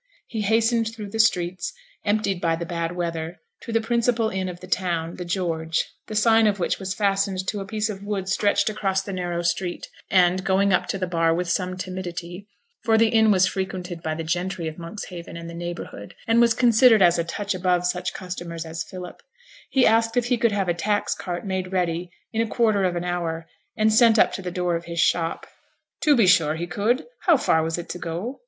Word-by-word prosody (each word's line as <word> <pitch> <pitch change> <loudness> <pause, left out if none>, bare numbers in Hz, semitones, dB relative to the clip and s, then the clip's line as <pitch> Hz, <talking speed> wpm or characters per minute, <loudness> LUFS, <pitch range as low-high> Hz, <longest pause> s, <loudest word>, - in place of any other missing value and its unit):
He 220 -2 -4
hastened 225 +2 +2
through 210 -3 -8
the 225 - -4
streets, 180 -4 +1 0.3
emptied 205 -3 0
by 165 -1 +2
the 170 +1 -5
bad 170 0 -3
weather, 170 -1 -3 0.2
to - - -7
the 225 0 +2
principal 235 0 +1
inn 190 -1 -2
of 175 -1 -8
the 185 - -10
town, 170 -2 -1
the 180 - -5
George 165 -3 -1 0.2
the 215 - -6
sign 225 +1 +5
of 205 -1 +1
which 180 - -1
was 190 -1 -4
fastened 195 -2 0
to 205 - -2
a 195 - -6
piece 215 +1 -1
of 200 -3 -6
wood 200 -2 -3
stretched 200 +1 +2
across 195 -3 0
the 195 - -6
narrow 175 -2 -2
street; 175 +1 -1 0.2
and 185 0 +3
going 195 +1 +2
up 180 - +2
to - - -2
the 185 - -1
bar 165 -2 +1
with 180 +1 -2
some 185 0 -1
timidity 180 0 -6 0.3
(for 225 -1 +3
the 225 0 +4
inn 220 -1 +4
was 190 -2 +5
frequented 185 -3 -4
by 155 -1 -2
the 165 - -4
gentry 175 +1 -2
of 160 +2 -7
Monkshaven 170 -1 -8
and 170 0 -7
the 170 - -8
neighbourhood, 170 -11 -7
and 230 +1 +4
was 235 -1 +4
considered 235 -3 +6
as 175 -1 +4
a - - +2
touch 205 +4 -3
above 180 -1 +1
such 180 0 -1
customers 175 -2 -6
as 160 0 -4
Philip), 180 -1 -9 0.5
he 265 -2 +3
asked 225 +1 +3
if 245 - +2
he 245 0 +1
could 235 -1 +3
have 200 -2 0
a 175 - +2
tax 205 +4 0
cart 175 0 -5
made 190 -1 -3
ready 175 -1 -1 0.2
in 225 - +1
a 230 - 0
quarter 215 -4 +2
of 180 -1 0
an 175 - -2
hour, 170 -2 -3 0.3
and 215 0 +3
sent 230 0 +6
up - - +4
to - - -4
the 180 - -4
door 180 -1 -1
of 170 +1 -4
his 170 0 -5
shop. 165 0 +1 0.6
'To 300 -2 +5
be 230 -5 +5
sure 160 -4 +4
he 170 +2 -3
could; 210 +8 0 0.2
how 335 -4 +7
far 160 -10 +2
was 160 +1 -2
it 175 - -6
to 180 - -5
go?' 175 +12 -5
185 Hz, 220 wpm, -24 LUFS, 175-215 Hz, 0.6 s, how